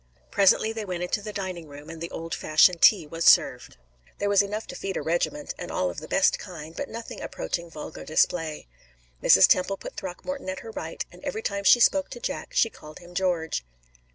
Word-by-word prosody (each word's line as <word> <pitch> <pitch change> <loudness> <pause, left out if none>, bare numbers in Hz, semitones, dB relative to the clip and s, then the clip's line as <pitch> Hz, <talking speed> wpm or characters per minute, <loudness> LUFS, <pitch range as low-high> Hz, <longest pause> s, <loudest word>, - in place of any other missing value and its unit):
Presently 200 +3 +4
they 225 -1 -4
went 180 -3 -4
into 180 +3 -1
the 210 +1 -6
dining 185 -5 -5
room, 145 +1 -12
and 165 0 -9
the 170 - -4
old 165 0 -6
fashioned 165 +3 +4
tea 190 -3 +6
was 165 +2 -5
served. - - +4 0.4
There 205 - -1
was 200 -1 +5
enough 210 +2 -4
to - - -9
feed 195 -1 -4
a - - -2
regiment, 175 - -1
and 175 - -6
all 90 -1 -1
of - - -7
the - - -10
best - - +3
kind, 155 +2 -9
but 285 - -4
nothing 230 0 -7
approaching 170 -1 -4
vulgar 155 -1 -8
display. 160 0 0 0.6
Mrs. - - +7
Temple 190 +2 +2
put - - -9
Throckmorton 195 +7 -5
at 185 - -4
her 225 - -9
right, - - -5
and - - -16
every 450 -2 -4
time 200 0 -2
she 240 - +7
spoke 285 +4 +3
to - - -8
Jack - - -4
she 225 - +3
called 155 0 -13
him 175 0 -14
George. 175 - -1
180 Hz, 210 wpm, -26 LUFS, 165-210 Hz, 0.6 s, Mrs